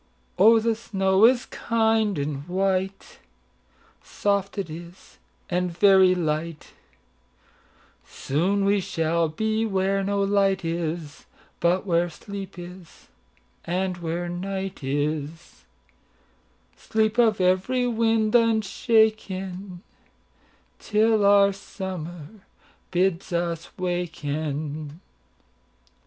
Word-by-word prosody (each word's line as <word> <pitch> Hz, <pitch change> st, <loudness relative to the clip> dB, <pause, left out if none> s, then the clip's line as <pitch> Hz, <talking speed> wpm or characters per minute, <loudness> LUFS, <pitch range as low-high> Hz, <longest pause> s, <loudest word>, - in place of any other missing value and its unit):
Oh, 225 Hz, +4 st, +7 dB
the 225 Hz, +1 st, +1 dB
snow 195 Hz, -3 st, +2 dB
is 245 Hz, +1 st, +4 dB
kind 220 Hz, -3 st, 0 dB
and 145 Hz, +1 st, -4 dB
white,—Soft 195 Hz, +1 st, -4 dB
it 195 Hz, -4 st, -2 dB
is, 170 Hz, +3 st, -12 dB, 0.3 s
and 180 Hz, 0 st, -1 dB
very 190 Hz, +1 st, +5 dB
light; 160 Hz, -1 st, -3 dB, 1.3 s
Soon 190 Hz, +8 st, -1 dB
we 200 Hz, +1 st, +3 dB
shall 165 Hz, -2 st, 0 dB
be 220 Hz, +7 st, -1 dB
where 195 Hz, -2 st, 0 dB
no 200 Hz, 0 st, 0 dB
light 195 Hz, -2 st, +1 dB
is, 165 Hz, -2 st, -4 dB, 0.3 s
But 180 Hz, +3 st, +1 dB
where 175 Hz, -2 st, +1 dB
sleep 195 Hz, +2 st, -9 dB
is, 175 Hz, -1 st, -12 dB, 0.5 s
and 185 Hz, +1 st, -2 dB
where 170 Hz, +1 st, -3 dB
night 190 Hz, 0 st, -5 dB
is,—Sleep 140 Hz, -, -5 dB
of 220 Hz, -4 st, +4 dB
every 185 Hz, +8 st, +2 dB
wind 225 Hz, -2 st, +1 dB
unshaken, 215 Hz, -5 st, +1 dB, 1.0 s
Till 215 Hz, 0 st, +2 dB
our 200 Hz, 0 st, +5 dB
Summer 180 Hz, -5 st, -7 dB, 0.6 s
bids 185 Hz, +1 st, 0 dB
us 170 Hz, -1 st, -2 dB
waken." 155 Hz, -4 st, -3 dB
185 Hz, 85 wpm, -24 LUFS, 165-200 Hz, 1.3 s, Oh